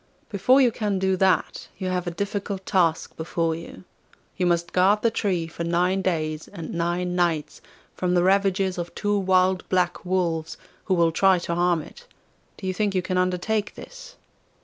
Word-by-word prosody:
Before 250 +7 +4
you 250 -3 +4
can 210 -3 -1
do 190 0 +1
that, 190 0 +1
you 190 - -4
have 180 -1 -2
a - - +1
difficult 200 +1 -4
task 170 -5 +1
before 165 0 -1
you. 160 - -9 0.5
You 180 - 0
must 170 0 0
guard 195 +3 +3
the 230 - +3
tree 190 -7 -1
for 165 +1 -6
nine 180 +3 +1
days 155 -4 -2
and 170 -5 -8
nine 175 +1 -1
nights 170 -4 -1 0.3
from 180 -1 -1
the 175 - +3
ravages 190 -1 +2
of 175 0 -6
two 205 0 0
wild 185 -1 +2
black 180 -1 0
wolves, 170 -3 -1 0.3
who 190 - +1
will 170 -1 +3
try 190 +3 +4
to 170 - -2
harm 175 -2 +1
it. 485 - -15 0.5
Do 195 - -9
you 185 - -1
think 200 +1 -1
you 185 - +1
can 185 0 -1
undertake 185 +4 -1
this? - - -11
185 Hz, 180 wpm, -24 LUFS, 170-195 Hz, 0.5 s, Before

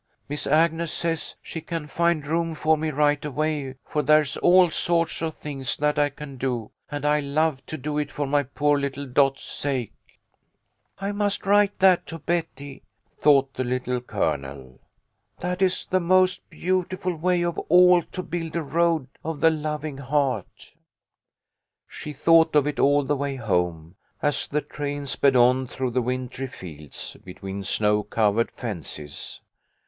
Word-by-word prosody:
Miss 145 +1 -4
Agnes 165 +2 +2
says 165 -2 -2
she 165 - -6
can 165 -1 -4
find 170 0 0
room 165 +1 -1
for 155 +1 +3
me 155 +1 -2
right 145 0 +2
away, 150 -2 -2
for 150 - -1
there's 150 0 +3
all 180 -1 +5
sorts 170 0 0
of 160 -1 -2
things 135 -4 -4
that 150 0 +1
I 145 0 +3
can 145 -1 -10
do, 120 -4 -2 0.2
and 145 -1 -4
I'd 150 -1 +2
love 150 -1 0
to 155 - -5
do 150 +2 -2
it 145 -1 -3
for 145 - -2
my 145 +1 +2
poor 145 +2 +1
little 140 0 -3
Dot's 135 +1 +2
sake.' 130 -6 -3 0.4
' - - -49
" 105 - -49
I 195 +1 -2
must 205 0 -1
write 205 0 +3
that 185 -2 +4
to 165 - -6
Betty," 155 -4 -3 0.4
thought 135 -2 +4
the 130 - -2
Little 125 0 -2
Colonel. 70 - -3 0.3
" - - -45
That 180 +1 -2
is 185 -1 +1
the 185 - +1
most 185 +1 +2
beautiful 185 +1 -1
way 175 +2 +1
of 170 -1 -1
all 180 +1 +7
to 185 +2 -7
build 165 -1 -4
a 170 - 0
Road 160 -1 +1 0.2
of 160 -1 -4
the 165 +1 +5
Loving 150 -2 -4
Heart." 140 -1 -2 1.1
She 150 - -8
thought 165 +2 +4
of 145 -2 +5
it 150 -1 -2
all 145 +1 +4
the 145 +2 0
way 140 0 -2
home, 90 -8 -1 0.3
as 145 -3 0
the 150 +1 -1
train 145 -1 -5
sped 135 0 +2
on 125 +1 +4
through 130 0 -3
the 125 +1 +1
wintry 130 +2 -3
fields, 75 - -9
between 95 +2 -7
snow 105 +1 +1
covered 110 +1 +1
fences. 80 - -7
145 Hz, 165 wpm, -25 LUFS, 130-165 Hz, 1.1 s, all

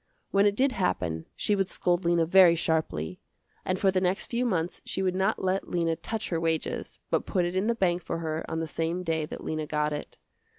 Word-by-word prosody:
When 200 +1 +4
it 205 - +1
did 270 +4 +3
happen 90 - -1
she 210 - +1
would 195 -2 +1
scold 175 0 0
Lena 170 -1 +3
very 175 0 +7
sharply, 155 - -1 0.4
and 185 - 0
for 195 0 +3
the 185 0 +1
next 185 +2 +1
few 245 +1 +1
months 175 -5 -1
she 190 - -2
would 185 -1 +1
not 190 +3 +1
let 190 +1 0
Lena 170 -2 +1
touch 220 +6 -4
her 165 - 0
wages, 165 -1 -2
but - - +1
put 180 -3 +1
it 175 +1 -3
in 190 +3 +1
the 235 - +2
bank 180 -4 +1
for 165 - -3
her 160 -1 -3
on 160 - -2
the 165 - -3
same 165 +3 -2
day 160 -3 -1
that - - -8
Lena 155 -1 -3
got 150 0 0
it. 145 - -6
175 Hz, 225 wpm, -28 LUFS, 160-190 Hz, 0.4 s, very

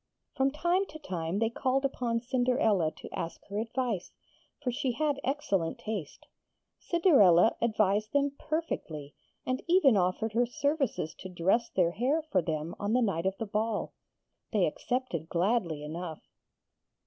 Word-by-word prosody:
From 270 +1 +2
time 345 +7 +1
to 310 - -9
time 180 - -3
they 225 +1 +1
called 265 +3 0
up 275 - -1 0.3
Cinderella 245 - +2
to - - -12
ask 165 - -4
her 200 +1 -2
advice, 230 -3 -2 0.5
for 255 -4 -1
she 250 +1 -1
had 290 +1 0
excellent 200 - 0
taste. 205 -9 -5 0.5
Cinderella 225 - +5
advised 215 -2 +2
them 285 0 +2
perfectly, 160 - -3 0.3
and 255 0 -1
even 335 - +5
offered 195 +4 +1
her 240 +2 +2
services 270 - -1
to 185 - -7
dress 190 +7 +1
their 175 -2 +2
hair 265 - 0
for 195 - +1
them 160 0 -3
on 205 +2 -1
the 250 0 +4
night 190 -4 0
of 190 - -1
the 225 - -3
ball. 215 +1 -1 0.6
They - - +3
accepted 245 - -2
gladly 175 -4 0
enough. 160 +1 -6
225 Hz, 150 wpm, -30 LUFS, 180-270 Hz, 0.6 s, Cinderella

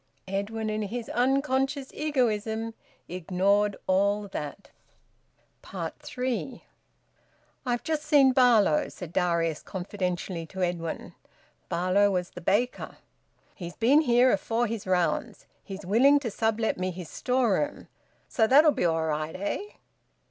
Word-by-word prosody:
Edwin, 205 +3 -3
in 215 0 -2
his 225 +3 -4
unconscious 270 +2 0
egoism, 225 -6 -1 0.3
ignored 195 +4 +1
all 200 +2 +1
that. 150 +3 -7 0.9
THREE. 250 0 -5 1.0
"I've 240 -1 0
just 315 -2 -1
seen 290 -3 +5
Barlow," 235 - +4
said 175 -2 -9
Darius 170 -3 0
confidentially 180 -2 -4
to 190 +1 -4
Edwin. 170 -2 -3 0.6
Barlow 185 +4 +2
was 180 -2 -2
the 180 - -9
baker. 215 +8 -1 0.6
"He's 175 -1 -8
been 270 +7 +4
here 250 -2 +4
afore 225 +4 0
his 225 -3 -4
rounds. 180 -2 0 0.2
He's 195 -1 -8
willing 265 +9 +5
to 235 -5 -3
sublet 220 0 0
me 185 0 -1
his 180 -2 -7
storeroom 255 - 0 0.4
so 220 -2 +2
that'll 295 +5 +6
be 180 - -1
all 165 -1 +1
right! 155 0 -2
Eh?" 200 +2 -2
210 Hz, 120 wpm, -27 LUFS, 180-250 Hz, 1.0 s, that'll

